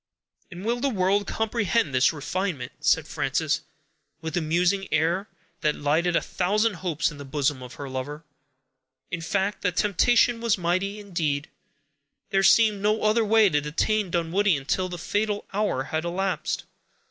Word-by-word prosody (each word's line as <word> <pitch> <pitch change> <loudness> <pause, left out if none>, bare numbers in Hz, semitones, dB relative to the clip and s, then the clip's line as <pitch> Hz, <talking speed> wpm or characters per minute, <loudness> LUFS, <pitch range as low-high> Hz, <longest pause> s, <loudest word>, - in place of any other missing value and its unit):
"And 180 +1 -9
will 240 +2 0
the 280 +2 +1
world 200 -2 +1
comprehend 220 - 0
this 130 +1 +4
refinement?" 160 -3 -3
said - - +2
Frances, - - -1 0.6
with 160 -1 -5
a 175 - +1
musing 180 +5 +1
air, 170 +6 +1 0.3
that 150 -2 +1
lighted 160 +4 +1
a - - +3
thousand 205 +2 0
hopes 165 -3 -1
in 145 - -11
the - - -6
bosom 140 -1 -1
of 125 -1 -9
her 140 - -7
lover. 135 +4 -5 0.9
In 170 - -3
fact, 195 +4 -1
the 180 - +1
temptation 230 +5 +3
was 230 -3 +2
mighty. 185 +4 -1
Indeed, 160 -8 -2 0.8
there 195 - +3
seemed 210 0 +5
no 210 +2 +1
other 215 +2 +3
way 220 0 +5
to 150 -3 +1
detain 190 +7 0
Dunwoodie 175 +2 +1
until 185 +7 -1
the 175 - -5
fatal 205 +3 -1
hour 200 -10 0
had 160 +3 -3
elapsed. 185 +2 -2
185 Hz, 160 wpm, -25 LUFS, 155-210 Hz, 0.9 s, seemed